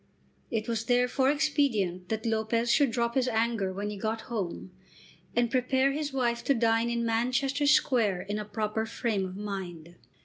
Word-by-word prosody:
It 220 -2 -2
was 230 -1 -2
therefore 250 +2 +2
expedient 255 - 0
that 220 0 -2
Lopez 230 +1 +1
should 285 -4 +4
drop 235 0 -1
his 260 -1 +1
anger 225 -4 0
when 200 +2 -4
he 210 - -6
got 220 +3 -2
home, 200 -6 -5 0.6
and 240 -1 +2
prepare 260 +2 +2
his 295 +1 -3
wife 240 -3 0
to 275 - +3
dine 230 0 +2
in 235 0 -1
Manchester 255 +5 +1
Square 225 -10 +3
in 205 +2 -3
a 210 - -4
proper 215 +1 -2
frame 220 -4 -1
of 185 +1 -8
mind. 175 -5 -6
230 Hz, 170 wpm, -28 LUFS, 210-250 Hz, 0.6 s, should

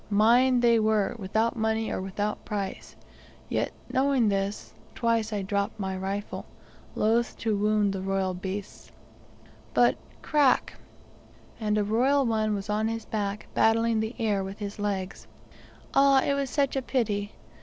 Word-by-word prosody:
Mine 240 +5 +4
they 235 -1 +5
were 215 -2 +1
without 220 +4 0
money 220 0 0
or - - -2
without 205 +2 -3
price; 200 -2 -5 0.5
yet, - - 0 0.2
knowing 260 -4 +3
this, 195 +1 -2 0.2
twice 230 -2 0
I 205 -2 -2
dropped 200 +2 -2
my 190 -1 -2
rifle, 195 +2 -4 0.5
loth 230 +2 +1
to 220 -2 0
wound 210 0 +2
the 190 - -4
royal 190 -1 -1
beasts, 190 +2 -6 0.8
but - - +4 0.3
crack! 290 -5 +3 0.9
and 210 -1 0
a 210 - +2
royal 260 +7 +2
one 215 -2 +1
was 200 0 -5
on 210 +1 0
his 225 0 -4
back 205 -1 -3
battling 225 0 +3
the 220 +3 -3
air 210 -5 0
with 195 +1 -7
his 205 -1 -6
legs. 195 -2 -3 0.7
Ah, 275 -1 +5
it 280 - +1
was 280 -1 -1
such 280 -1 0
a 270 - 0
pity! 210 -6 -1
215 Hz, 150 wpm, -27 LUFS, 200-230 Hz, 0.9 s, they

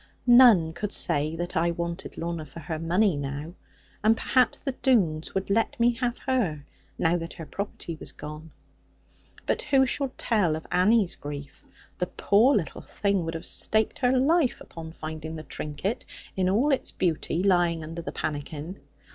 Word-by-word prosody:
None 240 -10 +7
could 205 +4 -4
say 150 +2 +1
that 175 +1 -4
I 170 +1 +2
wanted 170 +1 -4
Lorna 170 -1 -3
for 150 +2 -11
her 155 0 -5
money 180 +3 +2
now. 145 +3 -5 0.5
And 220 +1 +4
perhaps 255 -2 +2
the 270 - -3
Doones 195 - +1
would 190 +1 -1
let 225 +3 +1
me 240 +1 +4
have 240 +1 -2
her; 195 - 0 0.3
now 165 +2 +2
that 165 0 -6
her 165 - -8
property 175 -3 -6
was - - -6
gone. 150 +2 -9 1.0
But - - 0
who 270 -2 +3
shall 270 +1 -1
tell 200 -9 +1
of 160 - -7
Annie's 200 0 +3
grief? 145 -1 -8 0.4
The 180 - 0
poor 225 +11 +3
little 165 -9 -2
thing 200 -4 -1
would 165 0 -4
have 165 - -6
staked 220 0 +1
her 255 0 +3
life 285 +1 +2
upon 160 -1 -9
finding 160 0 -6
the 155 - -7
trinket, 150 +11 -4 0.3
in 185 -1 +1
all 240 +10 +3
its 265 - 0
beauty, 170 0 -1
lying 175 -4 +2
under 165 +2 -6
the - - -5
pannikin. 155 +4 -5
175 Hz, 170 wpm, -26 LUFS, 160-225 Hz, 1.0 s, None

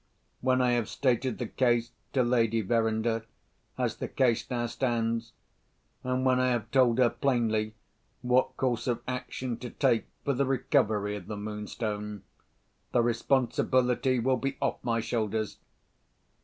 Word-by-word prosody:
When 130 0 +2
I 125 - +3
have 120 -2 0
stated 130 -1 0
the 120 - -3
case 120 0 +1 0.2
to 130 - +3
Lady 115 -2 +2
Verinder 110 +1 +1 0.5
as - - -1
the - - -3
case 120 -4 +1
now 120 -2 -1
stands, 115 -2 -1 0.7
and 130 +1 0
when 130 -1 +4
I 130 - +3
have 120 -2 -1
told 125 -3 +4
her 125 -2 +4
plainly 110 -5 0 0.5
what 125 +1 +2
course 125 -2 0
of 120 -2 -1
action 125 -1 -3
to 120 0 -7
take 115 - +1 0.2
for 140 - +2
the 135 +1 +1
recovery 110 -6 +1
of 100 -4 -8
the 105 - -5
Moonstone, 105 -1 -4 0.7
the 120 - +4
responsibility 125 +1 +2
will 130 +2 +2
be 135 +2 -3
off - - -1
my 115 -1 0
shoulders. 110 -2 -2
120 Hz, 145 wpm, -29 LUFS, 110-130 Hz, 0.7 s, when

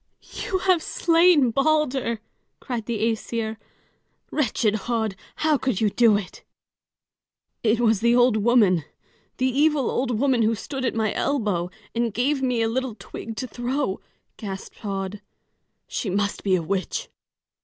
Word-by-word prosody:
"You 380 - 0
have 370 -2 +2
slain 330 -6 +4
Balder!" 275 -4 +1 0.4
cried 240 -4 -4
the 225 -3 -1
Æsir. 225 0 -1 0.7
"Wretched 230 -7 +1
Höd, 225 -4 0 0.2
how 310 -2 +2
could 255 -7 -1
you 215 -2 +2
do 225 -2 +5
it?" 200 -3 -8 1.2
"It 225 0 +2
was 225 -4 +3
the 235 +1 +4
old 245 -2 +5
woman 210 -7 +4 0.5
the 255 - +1
evil 280 +1 +2
old 245 -3 0
woman, 260 -3 +3
who 225 +1 +2
stood 265 +4 -5
at 235 - -1
my 220 -2 0
elbow 205 -11 0 0.2
and 235 -1 0
gave 270 +3 +1
me 250 -3 +1
a - - +2
little 250 0 -2
twig 225 +2 -8
to 255 - -4
throw," 245 -3 -2 0.4
gasped 195 -3 -7
Höd. 195 -1 -4 0.7
"She 210 - -3
must 200 +2 -1
be 190 -2 +3
a 175 - -1
witch." 190 +1 -2
235 Hz, 145 wpm, -24 LUFS, 215-265 Hz, 1.2 s, do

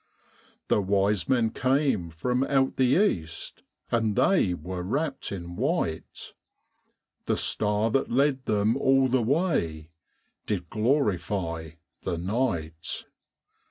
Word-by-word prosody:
The 105 - +3
wise 100 +1 +1
men 120 -4 +2
came 130 - +1
from 125 +11 -1
out 135 -1 +1
the 130 +2 +4 0.2
east, 80 -1 -8 0.3
And 110 -3 +1
they 125 - +3
were 90 +2 -5
wrapped 135 - -2
in 90 -3 -6
white; 125 - -2 0.9
The - - 0
star 105 +1 +1
that 135 - +1
led 135 +1 +1
them 105 +2 +2
all 135 -1 +4
the 130 0 +2
way 110 - 0 0.6
Did 90 -5 -3
glorify 95 - 0 0.3
the 90 -2 -2
night. 85 -5 -2
105 Hz, 115 wpm, -27 LUFS, 90-130 Hz, 0.9 s, the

